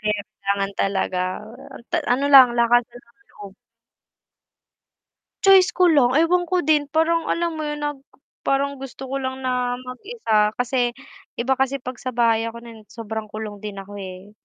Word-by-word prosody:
kaya 210 0 -1
kailangan 200 0 -2
talaga 190 -2 0 0.7
ta - - +1 0.2
ano 265 +3 0
lang 260 -4 +8
lakasan 240 0 +2
ng 235 - -30
loob. 200 -1 -12 1.9
Choice 385 -2 +7
ko 365 - +4
lang, 265 -4 +4
ewan 350 +3 +3
ko 360 0 +1
din 295 -1 +2
parang 325 +2 +1
alam 340 0 0
mo 310 - -4
yun 295 0 -4
na 295 0 -1 0.5
parang 280 0 0
gusto 265 0 -9
ko 275 - -1
lang 260 0 -4
na 250 -1 -1
mag-isa 250 - -1
kasi 245 0 0 0.4
iba 245 +3 -1
kasi 270 0 0
'pag 250 -1 -7
sa 255 -2 -5
bahay 230 -1 +2
ako 230 +1 -7
na 230 -1 -11
sobrang 220 -1 -6
kulong 215 -1 -7
din 210 -1 -6
ako, 200 +1 -9
eh. 190 +1 -9
245 Hz, 160 wpm, -22 LUFS, 220-280 Hz, 1.9 s, lang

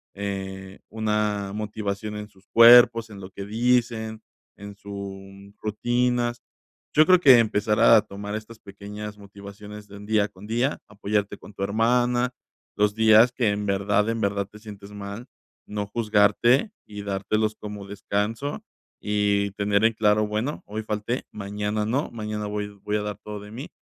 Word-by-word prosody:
eh, 95 -1 -6
una 105 -2 -1
motivación 105 0 -4
en 105 - -6
sus 95 -1 -25
cuerpos, 115 -1 +7
en 100 - -10
lo 95 0 -9
que 100 +1 -8
dicen, 115 -1 0 0.4
en 100 0 -10
su 100 0 -9
rutinas. 120 +2 0 0.5
Yo 155 +1 +6
creo 185 -1 +6
que 135 -7 +8
empezar 105 -1 +1
a 115 -2 +7
tomar 100 +2 -7
estas 110 +1 -7
pequeñas 105 +1 -9
motivaciones 100 +1 -11
de 100 - -11
un 100 - -10
día 105 -1 +2
con 100 +1 -14
día, 120 +6 0
apoyarte 105 0 -2
con 100 - -14
tu 100 - -7
hermana, 120 +4 +1 0.4
los 105 0 +2
días 110 +2 +6
que 120 -3 +1
en 105 0 -1
verdad, 100 +2 +1
en 115 -1 -2
verdad 100 -1 0
te 105 +1 -15
sientes 105 -2 -11
mal, 100 +3 -7 0.4
no 105 -1 -4
juzgarte 110 - +3 0.2
y 105 -1 -8
dártelos 105 +2 -1
como 105 -2 -8
descanso 105 - -3 0.4
y 100 -1 0
tener 100 +1 +1
en 115 0 +4
claro: 105 -1 +2
"Bueno, 110 +8 -3
hoy 110 +2 -5
falté, 110 +4 -3
mañana 105 +1 -3
no, 130 +6 -1
mañana 105 -2 -5
voy 105 0 -3
voy 105 0 -1
a 105 - -1
dar 105 -1 -4
todo 105 -1 -6
de 105 +1 -11
mí", 130 +7 -8
105 Hz, 160 wpm, -25 LUFS, 100-110 Hz, 0.5 s, que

